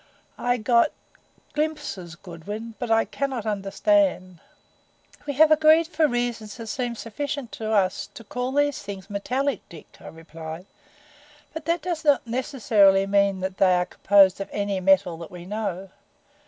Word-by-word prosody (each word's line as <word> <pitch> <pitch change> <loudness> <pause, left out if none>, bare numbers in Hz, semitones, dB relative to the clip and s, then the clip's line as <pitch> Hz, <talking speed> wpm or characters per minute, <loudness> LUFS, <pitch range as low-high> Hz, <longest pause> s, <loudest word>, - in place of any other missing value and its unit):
I 245 0 +1
got 235 +4 +3 0.6
glimpses 290 - -3
Goodwin, 200 +6 -8
but 245 - -4
I 225 0 +3
cannot 265 -5 -3
understand." 205 - +1 0.9
"We 285 - -1
have 310 +3 +5
agreed 310 +1 +6
for 320 -2 +2
reasons 240 -4 -3
that 230 - -7
seem 245 -1 -3
sufficient 260 +3 -5
to 220 -1 -4
us 190 -4 +1
to 230 - -10
call 250 +3 -3
these 290 +1 +1
Things 200 0 -8
metallic, 255 +7 -1
Dick," 165 -3 -14
I - - -12
replied. 160 +1 -9 0.9
"But 320 0 -7
that 335 -1 0
does 345 -3 -3
not 290 -4 +3
necessarily 220 -6 +3
mean 200 -1 +2
that 190 0 -4
they 185 -2 +4
are 180 0 +1
composed 195 0 +4
of 195 - -5
any 200 -1 -2
metal 185 -2 +3
that 170 - -8
we 175 -1 -10
know. 195 -2 -4
215 Hz, 155 wpm, -24 LUFS, 190-275 Hz, 0.9 s, agreed